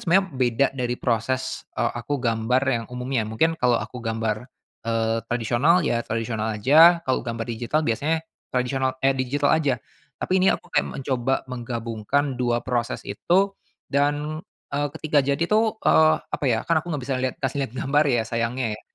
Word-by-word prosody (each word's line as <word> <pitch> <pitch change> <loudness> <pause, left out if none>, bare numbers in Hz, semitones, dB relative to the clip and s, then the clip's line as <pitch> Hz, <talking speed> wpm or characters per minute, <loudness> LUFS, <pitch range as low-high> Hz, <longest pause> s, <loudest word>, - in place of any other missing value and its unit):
sebenarnya 190 +3 +5 0.2
beda 125 +2 +3
dari 125 -2 -2
proses, 125 +2 -2
eee, - - 0
aku 145 +5 -2
gambar 120 0 +1
yang 120 -4 0
umumnya. 125 -3 -2
Mungkin 160 +9 0
kalau 125 -1 +4
aku 125 - -5
gambar, 115 +1 -2 0.4
eee, 115 0 +1
tradisional 125 +9 +2
ya 120 -5 +1
tradisional 110 -1 -2
aja, 165 +9 +6
kalau 130 - +1
gambar 115 -1 -4
digital 120 +7 -1
biasanya 155 +7 0 0.2
tradisional 130 +1 -1
eh, 135 - +5
digital 135 +2 0
aja. 145 -5 +2 0.4
Tapi 185 +1 0
ini 185 - +3
aku - - -1
kayak - - +2
mencoba 130 0 0 0.2
menggabungkan 120 +2 -2
2 120 -1 0
proses 120 -2 -2
itu 180 - +1 0.4
dan, 145 +2 0 0.3
eee, 145 +1 0
ketika 155 -2 +1
jadi 140 +3 0
tuh, 220 +1 +3
eee, 155 0 +5 0.2
apa - - -4
ya, 115 -2 +2
kan 165 -1 +3
aku 155 - -18
nggak 145 -3 -3
bisa 135 -1 -1
lihat 130 -1 -1
kasih 135 +1 -1
lihat 115 - -17
gambar 145 +4 +2
ya 120 -4 +2
sayangnya 115 +2 -1
ya. - - -16
130 Hz, 170 wpm, -24 LUFS, 115-145 Hz, 0.4 s, aja